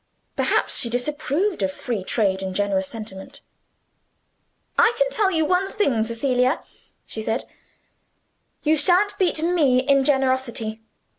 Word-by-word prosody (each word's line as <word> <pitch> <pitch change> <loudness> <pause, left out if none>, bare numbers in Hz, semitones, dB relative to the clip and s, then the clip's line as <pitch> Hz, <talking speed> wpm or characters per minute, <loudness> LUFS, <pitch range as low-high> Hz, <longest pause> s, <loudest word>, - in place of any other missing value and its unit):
Perhaps - - +1
she 240 - 0
disapproved 300 - -1
of 190 -1 0
free 220 -1 -4
trade 190 -2 0
in 190 -1 -4
generous 195 -1 0
sentiment. 220 +5 -9 1.3
"I 460 0 +4
can - - +3
tell 415 -5 +2
you 320 -4 +1
one 365 +4 +1
thing, 265 - +1
Cecilia," 250 +4 0 0.4
she 220 - -6
said; 225 +3 -2 1.2
"you 310 +1 +3
shan't 370 +7 +3
beat 340 -4 +1
ME 320 -7 +3
in 275 +1 +3
generosity. 260 -5 0
260 Hz, 130 wpm, -23 LUFS, 220-320 Hz, 1.3 s, I